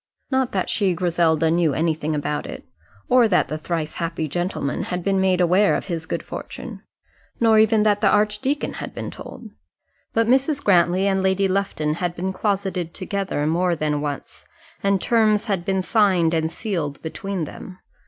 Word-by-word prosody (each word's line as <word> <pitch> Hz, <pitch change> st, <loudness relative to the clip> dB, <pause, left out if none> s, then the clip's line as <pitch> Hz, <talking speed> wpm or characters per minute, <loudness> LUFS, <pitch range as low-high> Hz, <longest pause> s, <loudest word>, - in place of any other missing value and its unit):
Not 260 Hz, -1 st, +1 dB
that -, -, -1 dB
she, 195 Hz, -4 st, +1 dB
Griselda, 165 Hz, -2 st, +2 dB
knew 165 Hz, -4 st, +2 dB
anything 155 Hz, -1 st, 0 dB
about 150 Hz, 0 st, -2 dB
it, -, -, -8 dB, 0.4 s
or 250 Hz, -2 st, +5 dB
that 185 Hz, -4 st, +2 dB
the 155 Hz, -, -3 dB
thrice 160 Hz, -1 st, -3 dB
happy 165 Hz, -2 st, -3 dB
gentleman 175 Hz, -3 st, -2 dB
had 180 Hz, -1 st, -3 dB
been 195 Hz, 0 st, +1 dB
made 185 Hz, -1 st, +2 dB
aware 185 Hz, +3 st, +4 dB
of -, -, -3 dB
his 165 Hz, -4 st, -4 dB
good -, -, -3 dB
fortune; -, -, -8 dB, 0.6 s
nor 225 Hz, -2 st, +5 dB
even 220 Hz, 0 st, +4 dB
had 205 Hz, -1 st, +2 dB
the 210 Hz, -, +4 dB
archdeacon 210 Hz, +8 st, 0 dB, 0.2 s
been -, -, -5 dB
told. -, -, -10 dB, 0.6 s
But 225 Hz, 0 st, +2 dB
Mrs. 270 Hz, +4 st, +2 dB
Grantly 180 Hz, 0 st, +3 dB
and 195 Hz, -1 st, +1 dB
Lady 190 Hz, +1 st, +2 dB
Lufton 185 Hz, -6 st, -1 dB
had 175 Hz, -1 st, -2 dB
been 190 Hz, +2 st, -3 dB
closeted 190 Hz, -4 st, -2 dB
together 195 Hz, -6 st, -2 dB
more 175 Hz, +3 st, +1 dB
than 150 Hz, -2 st, -1 dB
once, 145 Hz, -1 st, -6 dB, 0.4 s
and 200 Hz, -1 st, +2 dB
terms 215 Hz, -1 st, +2 dB
had 195 Hz, -6 st, -2 dB
been 190 Hz, -1 st, 0 dB
signed 185 Hz, -6 st, +3 dB
and 160 Hz, 0 st, 0 dB
sealed 165 Hz, -8 st, -3 dB
between 190 Hz, +2 st, -4 dB
them. 180 Hz, +4 st, -9 dB
185 Hz, 170 wpm, -22 LUFS, 165-205 Hz, 0.6 s, or